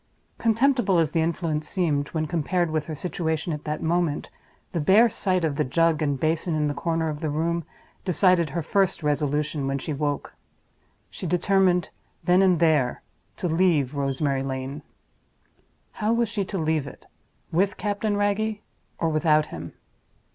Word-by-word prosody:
Contemptible 230 -3 +3
as 160 -3 +2
the 165 - +1
influence 160 -2 -1
seemed, 150 -6 0
when 155 0 -2
compared 170 +2 0
with 155 -1 -1
her 155 - -5
situation 160 0 -2
at 150 - -6
that 150 0 -3
moment, 165 -2 0 0.4
the 170 - -2
bare 200 +10 +5
sight 185 -4 0
of 145 -3 -2
the 150 - +2
jug 165 +4 +2
and 145 -3 0
basin 160 +2 0
in 150 -1 +1
a 145 - -1
corner 165 +1 -1
of 150 -1 -3
the 155 -1 -2
room 165 +3 -1 0.4
decided 180 -3 +3
her 165 +4 -3
first 195 -1 +1
resolution 150 0 0
when 135 0 0
she 150 +3 -4
woke. 145 0 -2 0.8
She 180 - -6
determined, 180 +1 +2 0.3
then 180 +2 +4
and 185 -4 +4
there, 155 -7 +2 0.3
to 185 - -2
leave 160 -5 +2
Rosemary 140 -1 0
Lane. 135 +2 -4 1.1
How 215 0 -1
was 235 -1 +1
she 210 -3 -1
to 195 - -4
leave 155 -3 0
it? - - -12 0.5
With 195 +4 +1
Captain 205 0 -1
Wragge, 205 +1 0 0.4
or 165 - 0
without 155 -1 +3
him? 85 0 -7
160 Hz, 160 wpm, -25 LUFS, 150-185 Hz, 1.1 s, bare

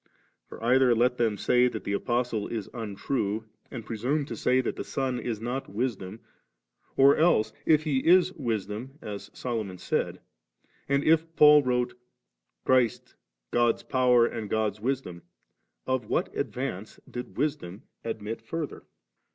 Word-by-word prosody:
for - - -10
either 125 0 +4
let 125 +2 +2
them 115 -3 +1
say 125 +5 +3
that - - -5
the 100 - -2
Apostle 120 0 -1
is 110 -4 -4
untrue, 110 0 -3 0.2
and 115 -4 -7
pre 115 - -5
sume 140 +6 0
to - - -6
say 125 +1 +2
that 130 - -1
the - - -4
Son 130 -2 -2
is 115 -4 -3
not 125 +4 -4
Wisdom, 105 -2 -3 0.8
or 135 +1 +7
else 110 -10 +3
if 155 -1 +5
He 145 -4 +1
is 180 +5 +4
Wisdom 115 - -4
as 100 -1 -7
Solomon 110 -7 -4
said, - - -2 0.7
and 140 0 +2
if 165 +1 +2
Paul 150 0 +8
wrote, 125 -2 0 0.4
* - - -54
Christ 130 -4 +2 0.4
God's 120 -1 +2
Power 125 -2 +4
and 110 -3 -4
God's 105 -1 -1
Wisdom,' 120 -9 -3 0.6
of 130 -4 -1
what - - -1
advance 120 -6 -4
did 125 0 -8
Wisdom 110 - -2 0.2
admit 115 -1 -4
further? 165 -3 -6
120 Hz, 150 wpm, -27 LUFS, 110-135 Hz, 0.8 s, Paul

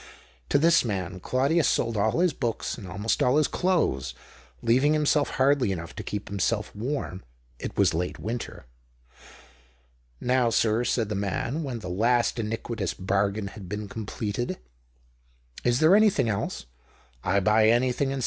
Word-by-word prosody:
To - - +4
this 165 +3 +4
man 95 -5 -3
Claudius 140 - +1
sold 115 -1 +1
all 110 +10 +1
his 180 -2 +3
books 120 -4 -2
and 100 -5 -9
almost 105 +4 -1
all 125 +3 +3
his 155 - +3
clothes, 65 - 0 0.5
leaving 130 +6 +3
himself 150 -1 +2
hardly 130 -4 +3
enough 85 -3 -5
to - - -5
keep 105 0 -5
himself 105 +3 -1
warm 115 -5 -4 0.2
— - - -35
it - - -6
was - - +4
late 90 +2 -2
winter. 115 - -5 1.5
"Now, 125 -1 +2
sir," 115 +1 +2
said 115 -4 0
the - - -2
man, 100 +9 -2
when 130 -6 -4
the 90 - -7
last 115 +6 +1
iniquitous 110 -2 -3
bargain 100 +2 -1
had 100 -3 -10
been 105 +1 -4
completed, 110 +2 -4 1.1
"is 120 0 +2
there 170 +6 +6
nothing 210 - +3
else? 100 - -3 0.6
I 100 +2 +2
buy 110 +2 +4
anything - - +7
and 120 +2 +3
THE - - +2
OCTAVE - - +1
OF 135 +3 -1
CLAUDIUS. - - -3
115 Hz, 165 wpm, -26 LUFS, 100-130 Hz, 1.5 s, anything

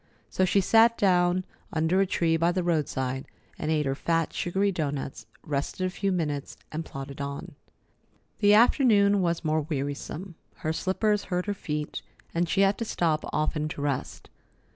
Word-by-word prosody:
So 185 - +2
she 195 +2 +3
sat 230 +4 +5
down 180 -1 +3 0.3
under 160 +4 +2
a 195 - +2
tree 165 -2 +1
by 165 +2 +2
the 185 0 -1
roadside 135 -6 -1 0.3
and - - -2
ate 155 -2 +1
her 135 - 0
fat, 165 +3 0
sugary 195 +3 0
doughnuts, 140 - -4 0.2
rested 145 +5 -2
a 185 - -1
few 195 +1 -1
minutes, 150 -6 -2
and 155 +1 -3
plodded 135 -1 -7
on. 140 0 -5 0.9
The 205 -1 +6
afternoon 210 -4 +5
was 170 -2 -1
more 155 0 +2
wearisome. 150 +4 -4 0.3
Her 155 - +1
slippers 205 +4 0
hurt 180 -1 -1
her 205 - -1
feet, 150 -6 -4 0.3
and 170 0 0
she 195 - +2
had 195 +1 +3
to - - -1
stop 160 -7 0
often 155 0 0
to 150 - -6
rest. 140 -3 -3
170 Hz, 165 wpm, -27 LUFS, 150-195 Hz, 0.9 s, The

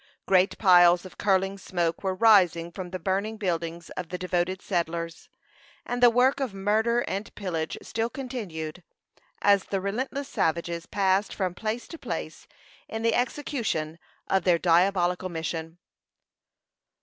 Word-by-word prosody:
Great 185 0 +3
piles 175 -2 +6
of 185 - -12
curling 195 0 +1
smoke 175 -3 -2
were 190 -1 0
rising 185 -6 +4
from 180 +1 -7
the 185 - -4
burning 195 +5 -2
buildings 170 -4 -3
of 180 -3 -6
the 180 - -4
devoted 185 +1 -1
settlers, 170 -3 -3 0.6
and 245 0 -3
the 245 - +8
work 250 +4 +3
of 255 -8 -3
murder 220 +4 +1
and 200 -2 -4
pillage 165 -6 -3
still 225 +1 -2
continued, 190 - -6 0.6
as 200 -1 +4
the 195 - -2
relentless 260 +8 -3
savages 170 - -1
passed 195 0 +1
from 185 -3 -1
place 220 +5 -4
to 330 - -9
place - - -6 0.4
in 225 0 -4
the 230 -1 +3
execution 235 - -2 0.3
of 190 - +1
their 175 -2 +4
diabolical 180 +1 +2
mission. 160 0 -4
190 Hz, 140 wpm, -26 LUFS, 170-215 Hz, 0.6 s, the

